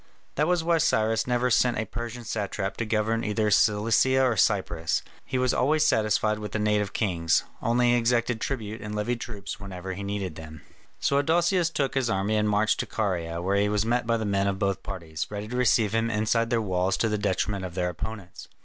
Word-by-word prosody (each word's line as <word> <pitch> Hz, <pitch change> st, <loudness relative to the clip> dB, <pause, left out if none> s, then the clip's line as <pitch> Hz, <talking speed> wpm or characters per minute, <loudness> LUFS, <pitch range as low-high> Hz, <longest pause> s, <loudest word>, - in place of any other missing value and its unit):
That 150 Hz, +2 st, +1 dB
was 175 Hz, -2 st, +1 dB
why 165 Hz, 0 st, +2 dB
Cyrus 110 Hz, -8 st, +1 dB
never 125 Hz, 0 st, +1 dB
sent 125 Hz, +1 st, +3 dB
a 110 Hz, -, -1 dB
Persian 120 Hz, +1 st, -6 dB
satrap 100 Hz, -2 st, -3 dB
to 115 Hz, -, -2 dB
govern 110 Hz, +1 st, 0 dB
either 105 Hz, 0 st, 0 dB
Cilicia 115 Hz, +5 st, +3 dB
or 125 Hz, -3 st, +2 dB
Cyprus; 95 Hz, -6 st, +1 dB, 0.2 s
he 130 Hz, -, -2 dB
was 125 Hz, -1 st, +2 dB
always 155 Hz, +4 st, +2 dB
satisfied 110 Hz, -3 st, +2 dB
with 105 Hz, -1 st, -6 dB
the -, -, 0 dB
native 105 Hz, -1 st, +1 dB
kings; 85 Hz, -6 st, +1 dB, 0.2 s
only 120 Hz, +1 st, +2 dB
he -, -, +4 dB
exacted 120 Hz, -1 st, +1 dB
tribute 110 Hz, -5 st, -4 dB
and 105 Hz, 0 st, -5 dB
levied 120 Hz, +3 st, -2 dB
troops 100 Hz, -4 st, -6 dB
whenever 95 Hz, -2 st, -6 dB
he 95 Hz, -, -7 dB
needed 100 Hz, -3 st, -3 dB
them. 80 Hz, -2 st, -10 dB, 0.4 s
So 140 Hz, -, +2 dB
Adousius 170 Hz, +3 st, +2 dB
took 140 Hz, -4 st, -1 dB
his 130 Hz, -3 st, 0 dB
army 100 Hz, 0 st, 0 dB
and 105 Hz, 0 st, +1 dB
marched 105 Hz, +1 st, +2 dB
into -, -, -8 dB
Caria, 85 Hz, -5 st, -1 dB
where 100 Hz, +2 st, +1 dB
he 100 Hz, +1 st, +2 dB
was 105 Hz, 0 st, +1 dB
met 120 Hz, 0 st, 0 dB
by 115 Hz, 0 st, +2 dB
the 110 Hz, -, -3 dB
men 100 Hz, -1 st, +1 dB
of 100 Hz, -1 st, -1 dB
both 95 Hz, 0 st, -1 dB
parties, 85 Hz, -6 st, -5 dB
ready 105 Hz, 0 st, -5 dB
to 125 Hz, -, -5 dB
receive 115 Hz, -4 st, +2 dB
him 115 Hz, 0 st, +1 dB
inside 115 Hz, +1 st, +1 dB
their 115 Hz, -2 st, +1 dB
walls 95 Hz, -1 st, 0 dB
to 115 Hz, -, +1 dB
the 105 Hz, -1 st, -1 dB
detriment 100 Hz, 0 st, -1 dB
of 90 Hz, -2 st, -6 dB
their 90 Hz, -1 st, 0 dB
opponents. 100 Hz, +1 st, -7 dB
105 Hz, 210 wpm, -26 LUFS, 100-120 Hz, 0.4 s, he